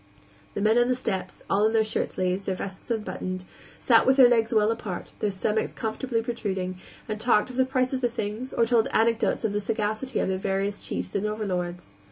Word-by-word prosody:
The - - -2
men 220 +3 +4
on 240 - +4
the 255 - +3
steps 195 -7 -4
all 205 +2 +3
in 220 - -1
their 220 -1 +4
shirt 215 - -1
sleeves, 185 +1 -1
their 190 - -1
vests 190 +3 -7
unbuttoned 185 -4 -3 0.3
sat - - +4
with 265 +1 +5
their 260 -2 +9
legs 230 -2 +2
well 215 -1 +3
apart, 210 -5 -5
their 210 - +1
stomachs 210 +3 -1
comfortably 230 0 -2
protruding, 190 -6 -3 0.3
and 215 -1 -3
talked 235 +1 +3
of - - -10
the 260 0 +3
prices 260 0 0
of 240 - +2
things, 220 +3 -4
or 235 - +2
told 230 -1 +3
anecdotes 230 +2 +2
of 210 - 0
the 205 - 0
sagacity 215 +4 -2
of - - +1
their 190 0 -1
various 195 +1 -1
chiefs - - -4
and 205 +1 0
overlords. 180 - -3
215 Hz, 210 wpm, -26 LUFS, 195-235 Hz, 0.3 s, their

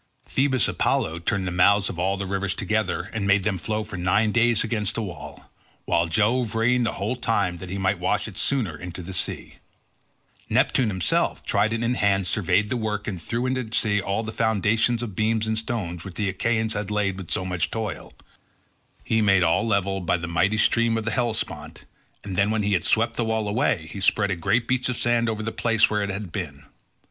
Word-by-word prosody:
Phoebus 130 -4 +1
Apollo 80 +1 0
turned 95 +2 -1
the 90 - -2
mouths 100 +3 +4
of 85 - -5
all 95 +2 +1
these 100 0 -4
rivers 100 0 -1
together 110 0 -1
and 105 -3 -2
made 100 0 +4
them 95 -1 -1
flow 110 +4 -2
for 105 -3 -8
nine 100 +5 +2
days 120 -1 +3
against 110 -2 -2
the 115 - -1
wall, 95 -5 -9 0.3
while 85 0 +2
Jove 115 +5 +1
rained 120 +1 +2
the - - -2
whole 105 +5 -2
time 100 -7 0
that 90 +1 -8
he 95 - -3
might 95 -1 0
wash 90 +4 0
it 105 - -10
sooner 110 - 0
into 90 +2 -7
the 95 +3 -7
sea. - - -3 0.9
Neptune 125 - +2
himself, 95 -5 0
trident 110 +3 +1
in 120 +1 +1
hand, 100 -4 +2
surveyed 95 +2 +1
the 125 - -1
work 105 -2 -3
and 95 -5 -4
threw 120 +7 -2
into 130 0 0
the 115 -2 -6
sea 105 -2 +1
all 100 +3 -1
the 110 - -4
foundations 110 +2 +1
of 105 -6 -6
beams 110 +1 +1
and 110 0 -1
stones 95 -7 -4
which 95 -3 -9
the 105 -2 0
Achaeans 110 +3 0
had 105 -2 -3
laid 105 -2 0
with 90 - -8
so 95 - -1
much 90 -2 -1
toil; 110 -2 -5 0.9
he 110 -1 +1
made 95 -3 +4
all 90 +7 +2
level 100 -2 0
by 90 0 +1
the 85 -1 -5
mighty 95 +6 +1
stream 115 +1 +2
of 110 - -3
the 115 - 0
Hellespont, 95 -10 -3 0.4
and 95 -2 -5
then 100 +3 +2
when 110 -1 0
he 105 +1 +1
had 90 - +1
swept 115 +2 +1
the 120 - +1
wall 110 -1 -1
away 105 - 0
he 100 - -6
spread 100 0 +2
a - - +1
great 115 +8 0
beach 130 0 0
of 125 - -2
sand 120 -1 +2
over 110 -1 -3
the 115 - -2
place 115 -2 +2
where 105 -1 +1
it 100 - -2
had 100 -2 -5
been. 75 -8 -5
105 Hz, 215 wpm, -24 LUFS, 95-115 Hz, 0.9 s, mouths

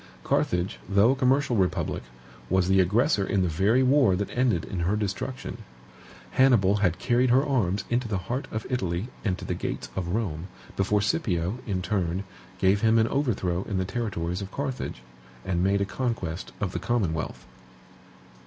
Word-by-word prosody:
Carthage, 90 +2 0
though 100 +4 +5
a - - +1
commercial 135 0 +2
republic, 95 -2 0 0.5
was 95 -1 +2
the 95 +1 +4
aggressor 105 - +3
in 95 -1 +1
the - - +1
very 100 +10 +3
war 130 -7 +4
that 100 +2 -3
ended 120 -10 +1
in 95 - -4
her 90 +5 +1
destruction. 105 +5 -4 0.7
Hannibal 115 -7 +4
had 90 -4 +1
carried 125 +1 +2
her 130 +4 +4
arms 105 -9 +1
into 120 0 0
the 105 -3 -1
heart 120 - -3
of 110 0 -4
Italy 95 -3 -2
and 95 -4 0
to - - -8
the - - -1
gates - - -4
of 95 -2 -2
Rome, 90 -7 -2 0.3
before 100 +1 +1
Scipio, 105 - 0
in 95 -3 -1
turn, 90 -1 -1 0.3
gave 95 +2 +3
him 115 0 +4
an 115 0 +3
overthrow 95 -11 0
in 100 - -1
the 95 - 0
territories 90 -4 -3
of 95 - -5
Carthage, 130 - -4 0.4
and 90 -2 0
made 100 +1 +2
a - - +2
conquest 100 -7 -3
of 100 -4 -1
the - - -3
commonwealth. 100 -10 -1
100 Hz, 170 wpm, -26 LUFS, 90-120 Hz, 0.7 s, though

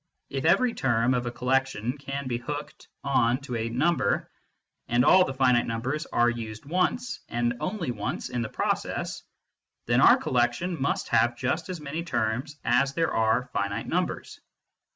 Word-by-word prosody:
If 135 +2 -3
every 215 +9 +4
term 120 -1 +1
of 125 -1 -1
a - - -2
collection 125 -2 0
can 140 -1 -5
be 120 -2 -2
hooked 145 +4 -7 0.2
on 125 -3 +2
to 125 -3 -5
a 115 0 -2
number, 125 -3 +1 0.6
and 120 +1 +3
all 185 - +7
the 135 - -4
finite 125 -2 +3
numbers 130 +8 -2
are 120 - +2
used 115 -2 -4
once, 185 - -1
and 120 0 0
only 185 -9 -2
once, 105 -4 -4
in 120 - -2
the 115 - -3
process, - - -2 0.6
then - - +3
our - - +8
collection 130 +7 0
must 140 - -1
have 120 +1 +3
just 155 +8 -2
as 180 -2 -4
many 150 +3 -4
terms 130 0 -2
as 135 +4 +2
there 165 -1 +1
are 115 +3 +1
finite 100 0 -2
numbers. - - -2
125 Hz, 165 wpm, -27 LUFS, 120-150 Hz, 0.6 s, our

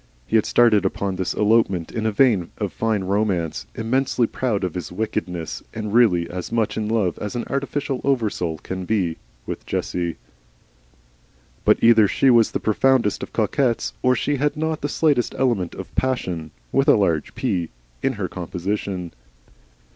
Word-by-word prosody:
He - - -2
had 110 - +3
started 115 -5 +4
upon 95 0 -1
this 90 -2 -2
elopement 105 -5 +2
in 110 -1 -1
a - - +1
vein 105 -6 +3
of 105 -3 -3
fine 110 -3 0
romance, 95 -4 -1
immensely 125 +2 +1
proud 110 -4 -2
of 90 -3 -2
his 90 -2 -5
wickedness, 90 -4 -3
and 105 -2 -4
really 95 -8 +4
as 90 0 -6
much 115 -2 0
in 110 -1 -2
love 105 -6 0
as 105 +3 -5
an 120 - -1
artificial 140 -1 -2
oversoul 105 - 0
can 95 +4 -6
be, 90 -6 0 0.3
with - - -5
Jessie. 85 -2 -2 1.5
But - - +4
either 115 -2 +7
she 135 +6 +3
was 115 -2 +5
the - - -2
profoundest 115 0 +2
of - - -6
coquettes 125 -4 0
or 125 0 +3
she 145 +4 0
had 145 +2 0
not 160 0 -1
the 145 - -2
slightest 145 -6 +1
element 115 -10 0
of - - -8
Passion 90 -12 -1 0.2
(with 135 - +2
a - - +7
large 85 -8 0
P) 95 -10 -1 0.3
in - - +1
her - - -3
composition. 90 0 -4
105 Hz, 165 wpm, -22 LUFS, 90-125 Hz, 1.5 s, either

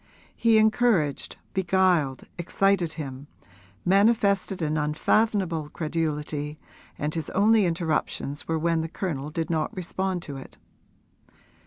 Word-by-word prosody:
He 230 -1 +4
encouraged, 215 - +2 0.2
beguiled, 180 -7 +2 0.2
excited 180 -1 +1
him, 140 -3 -7 0.6
manifested 200 -1 +3
an 155 0 0
unfathomable 165 +2 +1
credulity, 150 -2 -3 0.4
and 150 +1 -2
his 160 -3 -3
only 210 +1 +4
interruptions 160 -3 -2
were 165 - 0
when 165 0 +1
the 160 - -4
Colonel 150 -6 -3
did 160 +1 -3
not 155 -2 -1
respond 185 0 -2
to 140 -2 -7
it. 135 - -11
165 Hz, 115 wpm, -26 LUFS, 150-195 Hz, 0.6 s, He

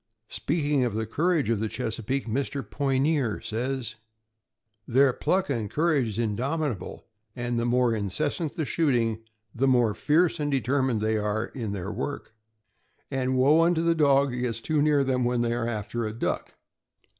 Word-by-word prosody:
Speaking 145 -3 0
of 120 -4 -1
the 110 0 -1
courage 155 +7 +1
of 115 - +1
the 110 0 -1
Chesapeake, 125 +3 -3
Mr. 135 +4 -2
Poy 135 -2 0
neer 135 - +1
says: 120 0 -3 0.9
Their 130 +2 +4
pluck 190 +8 0
and 110 -6 -2
courage 150 -4 +1
is 105 -1 -5
indomitable, 120 - -2 0.3
and 120 -1 -2
the 120 - 0
more 125 -1 +3
incessant 145 - -2
the 160 - -1
shoot 145 -1 +1
ing 115 -2 0 0.3
the 135 +3 +1
more 120 -4 +3
tierce 165 - +2
and 145 -1 -1
determined 130 -3 +1
they 110 0 +1
are 105 +1 -1
in 115 -6 -5
their 100 0 -4
work; 130 +3 -5 0.8
and 130 -1 0
woe 145 +5 +5
unto 165 -1 +2
the 170 0 +3
dog 140 -3 +3
that 125 - -4
gets 120 -2 -2
too 150 +5 0
near 145 -1 +3
them 130 -2 0
when 120 0 +1
they 115 0 0
are 120 0 -1
after 115 +1 -3
a 110 - -5
duck. 115 - -3
125 Hz, 175 wpm, -26 LUFS, 115-145 Hz, 0.9 s, woe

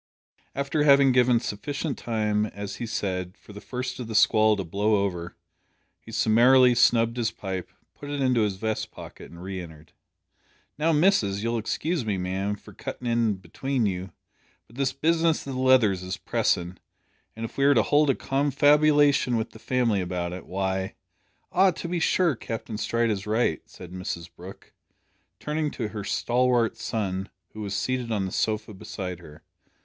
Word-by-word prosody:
After 140 +2 -1
having 140 -2 +6
given 125 -1 +4
sufficient 140 +6 -4
time, 105 -2 -1
as 100 -1 -7
he 120 - -4
said, 95 -4 -3
"for 105 - -15
the 105 - -9
first 125 0 -5
o' - - -3
the 110 -1 -6
squall 110 0 +4
to 95 - -2
blow 100 +5 +1
over," 90 -3 -5 0.6
he 115 - -13
summarily 120 +3 +5
snubbed 115 -1 +3
his 115 -2 +1
pipe, 95 -4 -5 0.2
put 145 - -10
it 145 0 -3
into 130 -3 +2
his 105 -3 0
vest 110 +2 -3
pocket, - - -11
and 85 +1 -11
re 95 -1 -5
entered. 80 -2 -13 0.8
"Now, 160 +3 +1
missus, 150 - +2
you'll 115 0 0
excuse 155 +7 -2
me, 105 -3 -1
ma'am, 95 +3 -2
for - - -15
cuttin' 125 - -7
in 115 -4 +1
atween 130 +7 -1
you, 95 -1 -3 0.5
but 115 - -20
this 135 -1 +1
business 165 +3 +1
o' - - -4
the 130 - -3
Leathers 125 -8 +4
is 90 +1 -4
pressin', 90 +1 -1 0.6
an' 115 - -7
if 115 - -6
we 140 - +2
are 140 0 +5
to 110 - +4
hold 150 0 +3
a 135 - +3
confabulation 145 -1 +3
wi' 110 - 0
the 110 - -14
family 115 -5 +1
about 90 -1 -3
it, 90 - -8
why 95 0 -2 0.3
" - - -43
"Ah, 190 +1 +5
to 175 0 -5
be 175 0 -1
sure, 170 -2 +2
Captain 115 -1 -6
Stride 115 0 +1
is 100 -1 -4
right," 110 -7 +1
said 90 -1 -11
Mrs 90 -2 -5
Brooke, 95 +3 -12 0.7
turning 150 0 -2
to 115 -6 -4
her 105 -2 -6
stalwart 120 +1 +1
son, 95 -3 -3 0.2
who 110 - -7
was 100 -1 -3
seated 125 +2 -2
on 100 -3 0
the 95 - -4
sofa 110 +1 -1
beside 90 -2 -6
her. 75 -3 -14
110 Hz, 180 wpm, -26 LUFS, 95-130 Hz, 0.8 s, having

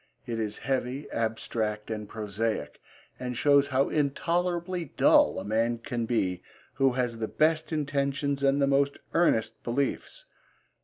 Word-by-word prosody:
It 115 -1 -3
is 105 -1 -2
heavy, 130 +1 -1
abstract 110 -1 -2
and 105 -1 -5
prosaic, 110 +1 -3 0.4
and 125 -1 -4
shows 140 0 +4
how 135 0 +1
intolerably 175 +4 0
dull - - +5
a - - -4
man 115 +3 +1
can 115 0 -3
be 95 -7 0 0.3
who 135 -1 +2
has 125 -2 -1
the 110 - -1
best 155 +4 +1
intentions 140 -2 -1
and 140 0 +3
the 140 - +4
most 140 0 +2 0.2
earnest 115 -10 +2
beliefs. 140 - -2
130 Hz, 140 wpm, -28 LUFS, 115-145 Hz, 0.4 s, dull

